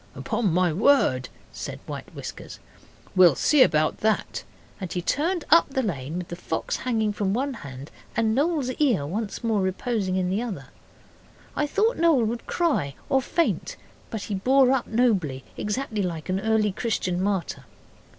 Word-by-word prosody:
'Upon 215 Hz, -6 st, -1 dB
my 175 Hz, -1 st, +2 dB
word,' 160 Hz, -, +3 dB, 0.2 s
said -, -, -6 dB
White -, -, -8 dB
Whiskers. -, -, -8 dB, 0.6 s
'We'll 180 Hz, -6 st, +7 dB
see 300 Hz, -3 st, +4 dB
about 155 Hz, -9 st, +3 dB
that,' 220 Hz, 0 st, 0 dB, 0.4 s
and 185 Hz, -4 st, -5 dB
he 180 Hz, -, -1 dB
turned 325 Hz, -, 0 dB
up 335 Hz, -1 st, +6 dB
the 265 Hz, -1 st, -1 dB
lane 155 Hz, -, -3 dB
with 180 Hz, -1 st, -5 dB
the 175 Hz, -, -5 dB
fox 165 Hz, -2 st, -3 dB
hanging 220 Hz, -4 st, 0 dB
from 200 Hz, -1 st, -1 dB
one 270 Hz, +3 st, -1 dB
hand 140 Hz, -, -9 dB, 0.3 s
and 225 Hz, -1 st, +2 dB
Noel's 285 Hz, -1 st, +1 dB
ear 240 Hz, -, +2 dB
once 205 Hz, +9 st, -4 dB
more 220 Hz, -3 st, +1 dB
reposing 190 Hz, +1 st, -1 dB
in 185 Hz, -1 st, 0 dB
the 200 Hz, +4 st, 0 dB
other. 185 Hz, -, -6 dB, 0.9 s
I 295 Hz, -, 0 dB
thought 425 Hz, +9 st, +1 dB
Noel 325 Hz, -7 st, +4 dB
would 235 Hz, +2 st, -4 dB
cry 280 Hz, -, 0 dB
or 265 Hz, -, +3 dB
faint. 335 Hz, +5 st, -1 dB, 0.3 s
But 220 Hz, -3 st, -4 dB
he 210 Hz, -, -4 dB
bore 255 Hz, +6 st, +4 dB
up 265 Hz, -2 st, +1 dB
nobly 195 Hz, -, +1 dB
exactly 215 Hz, 0 st, -2 dB
like 170 Hz, -3 st, -4 dB
an 185 Hz, +1 st, +1 dB
early 215 Hz, 0 st, +2 dB
Christian 185 Hz, -4 st, -1 dB
martyr. 190 Hz, -9 st, -2 dB
210 Hz, 165 wpm, -25 LUFS, 180-255 Hz, 0.9 s, We'll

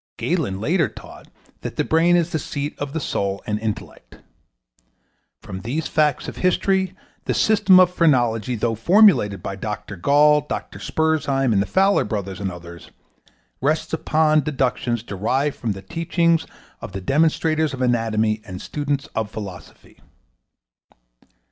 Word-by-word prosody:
Galen 145 Hz, -, -1 dB
later 160 Hz, -, +1 dB
taught -, -, -13 dB, 0.3 s
that -, -, -6 dB
the -, -, 0 dB
brain 165 Hz, +2 st, +3 dB
is 175 Hz, -1 st, +1 dB
the 160 Hz, -, -1 dB
seat 145 Hz, +1 st, -4 dB
of 145 Hz, -1 st, -4 dB
the 160 Hz, -, -1 dB
soul 100 Hz, -8 st, -2 dB
and 105 Hz, -2 st, -2 dB
intellect. 110 Hz, -1 st, -6 dB, 1.3 s
From 95 Hz, 0 st, -7 dB
these 140 Hz, +9 st, -3 dB
facts 150 Hz, -3 st, +1 dB
of -, -, -7 dB
history 190 Hz, +1 st, +1 dB, 0.3 s
the -, -, -1 dB
system 200 Hz, -4 st, +5 dB
of 180 Hz, -1 st, +4 dB
phrenology, 125 Hz, -, +2 dB
though 115 Hz, +1 st, -1 dB
formulated 115 Hz, -, +4 dB
by 100 Hz, -, -4 dB
Dr. 105 Hz, 0 st, -5 dB
Gall, 150 Hz, +9 st, +4 dB
Dr. 145 Hz, -, -6 dB
Spurzheim, 145 Hz, -5 st, 0 dB
the 100 Hz, -, 0 dB
Fowler 195 Hz, -, +3 dB
Brothers 100 Hz, -3 st, -4 dB
and 100 Hz, -2 st, -3 dB
others, 85 Hz, -1 st, -11 dB, 0.7 s
rests 155 Hz, +5 st, 0 dB
upon 155 Hz, -1 st, +2 dB
deductions 125 Hz, -5 st, -1 dB
derived 130 Hz, +8 st, -1 dB
from 115 Hz, -6 st, -3 dB
the 95 Hz, 0 st, -10 dB
teachings 170 Hz, -, 0 dB, 0.3 s
of -, -, -8 dB
the 95 Hz, -, -5 dB
demonstrators 155 Hz, -, +1 dB
of 130 Hz, -2 st, -6 dB
anatomy 110 Hz, -3 st, +1 dB
and 90 Hz, -1 st, -8 dB
students 145 Hz, +2 st, -3 dB
of 110 Hz, -2 st, -2 dB
philosophy. 95 Hz, -7 st, -10 dB
135 Hz, 140 wpm, -21 LUFS, 105-160 Hz, 1.3 s, system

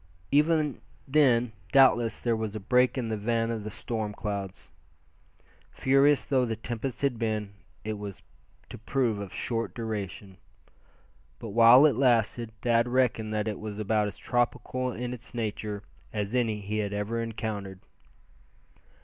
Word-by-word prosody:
Even 150 Hz, 0 st, +2 dB, 0.3 s
then 125 Hz, -5 st, +3 dB, 0.2 s
doubtless 130 Hz, -4 st, +5 dB
there 120 Hz, -2 st, 0 dB
was 110 Hz, -1 st, -4 dB
a -, -, -3 dB
break 125 Hz, +6 st, +2 dB
in 120 Hz, -3 st, -2 dB
the 110 Hz, -, -1 dB
van 115 Hz, +2 st, 0 dB
of 110 Hz, -2 st, -4 dB
the 110 Hz, -, -5 dB
storm 110 Hz, -1 st, -4 dB
clouds. 100 Hz, -3 st, -5 dB, 1.0 s
Furious 135 Hz, +2 st, +3 dB
though 130 Hz, -3 st, +2 dB
the 115 Hz, -2 st, -1 dB
tempest 120 Hz, +4 st, -5 dB
had 130 Hz, -5 st, +1 dB
been, 110 Hz, -3 st, -2 dB, 0.3 s
it 110 Hz, -1 st, -4 dB
was 100 Hz, -2 st, -8 dB, 0.5 s
to -, -, -9 dB
prove 115 Hz, -1 st, 0 dB
of 100 Hz, -3 st, -6 dB
short 115 Hz, -1 st, -3 dB
duration. 100 Hz, -4 st, -5 dB, 1.0 s
But 115 Hz, -, -7 dB
while 115 Hz, +6 st, +7 dB
it 145 Hz, -6 st, +4 dB
lasted 120 Hz, -2 st, +2 dB
Thad 115 Hz, 0 st, +3 dB
reckoned 120 Hz, -3 st, +1 dB
that 105 Hz, 0 st, -1 dB
it 105 Hz, -3 st, -3 dB
was 105 Hz, -1 st, -6 dB
about 105 Hz, 0 st, +1 dB
as 100 Hz, -, -7 dB
tropical 125 Hz, +1 st, -1 dB
in 125 Hz, +1 st, -4 dB
its 125 Hz, 0 st, -10 dB
nature 105 Hz, -2 st, -3 dB, 0.3 s
as 105 Hz, 0 st, -3 dB
any 115 Hz, -4 st, 0 dB
he 105 Hz, +2 st, -3 dB
had 100 Hz, -1 st, -2 dB
ever 105 Hz, +3 st, -2 dB
encountered. 105 Hz, -4 st, -5 dB
115 Hz, 150 wpm, -28 LUFS, 105-125 Hz, 1.0 s, while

